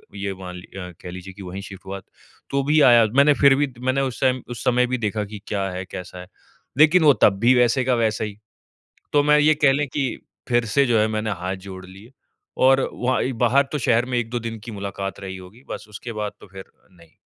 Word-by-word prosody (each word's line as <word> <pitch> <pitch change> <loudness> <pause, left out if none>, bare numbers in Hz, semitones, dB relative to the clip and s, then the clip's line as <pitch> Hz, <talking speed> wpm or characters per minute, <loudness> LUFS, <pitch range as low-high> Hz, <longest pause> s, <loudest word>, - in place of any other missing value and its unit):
ये 100 0 -3
मान 90 -1 -8
लि 90 - -11
अ, 90 -1 -7
कह 90 - -8
लीजिए 95 +1 -9
की 100 - -12
वही 95 +2 -7
शिफ्ट 95 -1 -11
हुआ, 100 +1 -6 0.5
तो 140 0 0
भी 150 +2 +3
आया 120 -3 +7
मैंने 145 +1 +6
फिर 140 -1 +7
भी 140 -2 -1
मैंने 130 +2 0
उस 130 -1 -3
टाइम 130 -1 +2
उस 120 -1 -6
समय 125 -1 +2
भी 130 - -1
देखा 105 -2 -2
की 105 0 -9
क्या 100 -2 -2
है 90 +1 -5
कैसा 90 0 -8
है? 90 - -10 0.5
लेकिन 160 +3 +5
वो 145 -2 +7
तब 100 -2 +4
भी 120 +3 +5
वैसे 125 +1 +3
का 125 -1 +2
वैसा 110 -2 0
ही, 105 -1 -6 0.8
तो 145 -1 +4
मैं 150 0 +4
ये 155 +1 +4
कह 135 - +7
लें 145 +1 0
की 135 +1 -1 0.4
फिर 120 -1 +2
से 140 -1 +5
जो 115 -3 +2
है 110 - +3
मैंने 110 0 -2
हाथ 95 +1 -2
जोड़ 95 0 -9
लिए 100 +7 -14 0.5
और 135 +1 +4
वहाँ 125 +1 0
ही 130 - -2
बाहर 135 +4 +4
तो 150 - -1
शहर 120 -1 +2
में 125 -1 -2
1-2 120 +1 -2
दिन 115 -1 -6
की 115 - -7
मुलाकात 100 -1 -5
रही 95 -1 -7
होगी 95 +8 -14
बस 105 - -6
उसके 115 +3 -8
बाद 105 -1 -3
तो - - -13
फिर, 95 0 -10 0.3
नहीं। 85 -3 -20
115 Hz, 240 wpm, -22 LUFS, 100-130 Hz, 0.8 s, आया